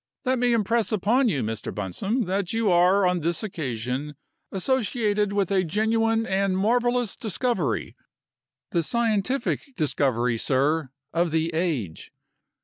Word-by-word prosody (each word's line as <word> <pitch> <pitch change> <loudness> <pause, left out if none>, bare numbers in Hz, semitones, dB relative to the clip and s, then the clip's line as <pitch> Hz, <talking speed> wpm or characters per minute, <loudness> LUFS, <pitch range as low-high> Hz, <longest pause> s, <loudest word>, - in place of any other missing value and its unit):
Let 255 0 +1
me 245 0 +2
impress 230 +1 +1
upon 225 +5 +2
you, 145 -9 -1
Mr. 110 0 -4
Bunsome, 195 - -2
that 190 +1 -1
you 225 -3 +2
are, 180 +3 +4
on 180 -1 +2
this 170 +5 -2
occasion, 135 - -4 0.4
associated 210 -1 0
with 200 -2 0
a 190 -1 +3
genuine 225 +5 +1
and 195 -1 0
marvelous 240 +2 +1
discovery 185 - -2 0.8
the 170 - +2
scientific 235 - 0 0.2
discovery, 125 -7 +1
sir, 140 +3 +1 0.2
of 170 +1 +1
the 160 +1 0
age. 150 - -2
190 Hz, 130 wpm, -25 LUFS, 155-225 Hz, 0.8 s, are